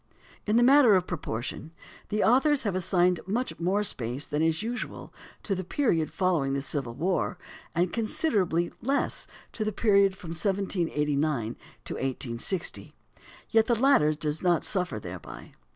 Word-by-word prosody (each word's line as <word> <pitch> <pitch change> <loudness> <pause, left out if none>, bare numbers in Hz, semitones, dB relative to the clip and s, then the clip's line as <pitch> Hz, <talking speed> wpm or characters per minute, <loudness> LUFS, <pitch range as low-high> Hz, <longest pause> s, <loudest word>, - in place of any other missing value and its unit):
In 210 - +2
the 240 - +5
matter 260 -4 +7
of 180 -1 +2
proportion, 150 -1 -5 0.4
the 210 0 0
authors 270 +4 +4
have 205 -4 -1
assigned 180 -1 +2
much 240 +6 -2
more 190 +5 +1
space 130 - 0
than 150 +1 -2
is 160 +4 +1
usual 240 +2 -5 0.3
to 200 - -1
the 185 0 -3
period 175 - 0
following 165 -8 0
the 140 - -1
Civil 135 -5 -3
War, 180 +4 -1 0.4
and 175 +2 +1
considerably 205 - 0
less 275 +4 -1 0.2
to 220 - -3
the 215 - -1
period 200 -2 +3
from 175 - -9
1789 155 - -1 0.3
to - - -4
1860; 135 +6 -3 0.6
yet 225 -1 +4
the 235 -2 +2
latter 165 - +4
does 150 0 -2
not 175 -3 +2
suffer 180 - 0
thereby. 90 -3 -9
180 Hz, 150 wpm, -27 LUFS, 150-210 Hz, 0.6 s, matter